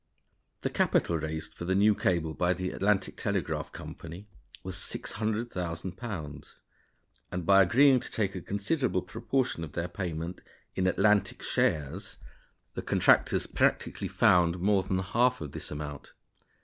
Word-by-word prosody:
The - - -2
capital 85 -1 +2
raised 80 +1 -4
for 85 - -7
the 95 +1 +1
new 105 +2 +5
cable 85 -5 0
by 90 +2 +1
the 90 +1 -3
Atlantic 100 -1 0
Telegraph - - -2
Company 85 +5 -9 0.4
was 95 0 -5
£600,000; 95 -5 -4 0.8
and, 90 -2 -3
by 100 +1 +7
agreeing 130 +8 +5
to - - -7
take 100 -3 -1
a 90 - -5
considerable 100 - -1
proportion 125 -3 -1
of 80 -1 -8
their 85 +1 -2
payment 85 -1 -5 0.3
in 95 0 0
"Atlantic" 105 +1 +2
shares, 75 -3 -1 0.6
the - - -4
contractors - - +3
practically - - 0
found 90 -1 +4
more 100 +1 +3
than 95 0 -1
half 120 +7 +2
of 75 -3 -6
this - - -7
amount. 75 -1 -7
95 Hz, 135 wpm, -29 LUFS, 85-105 Hz, 0.8 s, by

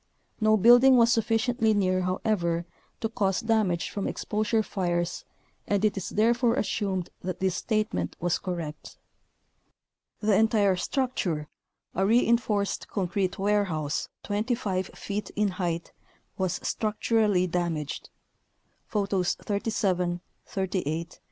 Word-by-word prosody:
No 215 -1 +4
building 245 +5 +7
was 235 0 +5
sufficiently 225 0 +2
near, 185 -2 +2
however, 180 -2 0 0.4
to 225 - 0
cause 195 -4 0
damage 215 -7 +1
from 200 - -2
exposure 215 +1 0
fires 175 -3 -2 0.4
and 205 +1 +2
it 210 - +2
is 195 - -4
therefore 235 +2 +2
assumed 195 -6 -1
that 180 -1 -4
this 190 -1 +1
statement 215 0 -1
was 175 0 0
correct. 165 -5 -6 1.2
The 210 -1 +2
entire 210 -2 +4
structure, 180 - -1 0.4
a 190 - 0
reinforced 225 -1 +2
concrete 185 -1 -1
warehouse 190 -7 0
25 205 -3 -1
feet 205 +1 -4
in 210 -1 +2
height, 175 -3 -3 0.4
was 185 -3 -1
structurally 215 -3 +1
damaged 170 -4 -2 0.8
(Photos 195 -3 0
37, 190 -4 -1 0.3
38, 175 -4 -2
39). - - -18
200 Hz, 115 wpm, -27 LUFS, 180-220 Hz, 1.2 s, building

